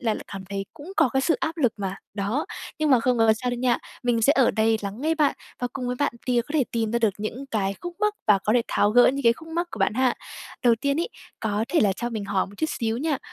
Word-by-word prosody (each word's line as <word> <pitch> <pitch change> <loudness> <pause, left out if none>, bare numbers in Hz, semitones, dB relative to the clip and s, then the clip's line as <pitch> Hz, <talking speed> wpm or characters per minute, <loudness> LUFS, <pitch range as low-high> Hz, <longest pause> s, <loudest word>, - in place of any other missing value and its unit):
là 225 -5 +1
lại - - -7
cảm 195 -1 -6
thấy 195 0 -2
cũng 325 +7 -10
có 345 - +5
cái 265 +2 +1
sự 325 +4 +2
áp 330 0 -2
lực 250 -8 +2
mà, 195 -1 -3 0.2
đó. 215 +8 -1 0.3
Nhưng 305 -2 +1
mà 255 - +6
không 245 0 +1
có 225 -1 +5
sao 250 - 0
đây 245 - -2
nha, 245 -1 +2 0.2
mình 240 -2 +1
sẽ 275 - +6
ở 265 -3 +5
đây 220 0 +2
lắng 200 +3 -5
nghe 320 +3 +1
bạn, 300 -3 +2 0.2
và 245 - -1
cùng 255 -2 -4
với 250 0 -2
bạn 285 - +1
tìm 245 -1 +3
có 290 - -10
thể 285 - +3
tìm 225 -2 0
ra 235 - +2
được 220 -4 +2
những 235 +6 -5
cái 200 -6 -1
khúc 350 0 -6
mắc 420 0 +2
và 210 -2 +6
có 210 - +2
thể 240 0 +4
tháo 205 - +2
gỡ 245 +2 +6
những 275 +2 +1
cái 230 - +6
khúc 320 +7 -13
mắc 345 +2 -2
của - - -7
bạn - - +1
ha. 255 0 +2 0.5
Đầu 240 -1 +6
tiên 280 +2 +1
ấy, 345 - -1 0.3
có 215 0 0
thể 340 - +2
là 200 -2 +4
cho 240 +5 -4
mình 220 -3 -4
hỏi 195 -1 0
một - - -14
chút 315 - 0
xíu 225 0 0
nha, 300 -1 0
245 Hz, 295 wpm, -25 LUFS, 220-280 Hz, 0.5 s, mà